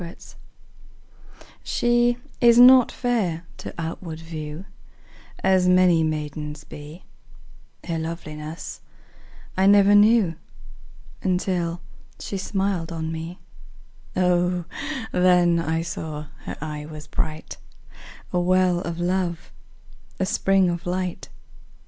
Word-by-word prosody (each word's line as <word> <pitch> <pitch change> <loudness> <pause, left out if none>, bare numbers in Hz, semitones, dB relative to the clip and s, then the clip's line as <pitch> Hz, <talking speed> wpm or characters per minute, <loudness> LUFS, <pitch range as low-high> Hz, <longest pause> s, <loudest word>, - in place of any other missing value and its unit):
Song 170 +1 -7 1.5
SHE 240 0 +2 0.2
is 235 -1 +6
not 250 0 +8
fair 195 -10 -1
to - - -7
outward 165 0 -5
view 160 +1 -7 0.8
As 190 -1 +4
many 180 -2 +5
maidens 150 -1 -3
be, 150 +4 -11 0.8
Her 165 -2 -2
loveliness 160 -1 -6 0.7
I 190 +1 +3
never 200 0 +6
knew 205 -5 +5 0.8
Until 180 -2 -1 0.4
she 195 - -4
smiled 190 -3 -1
on 160 -1 -3
me; 165 +2 -6 0.8
O, 180 -1 +1 0.5
then 180 -2 +4
I 165 0 -1
saw 155 -2 -6 0.2
her - - -6
eye 150 -1 -6
was 155 -1 -9
bright, 155 +1 -4 0.7
5 - - -27
A 180 - +2
well 185 0 +3
of 170 -1 -5
love, 175 -1 -1 0.7
a 190 - +1
spring 195 0 +2
of 175 0 -3
light! 180 0 -3
175 Hz, 105 wpm, -24 LUFS, 160-185 Hz, 1.5 s, not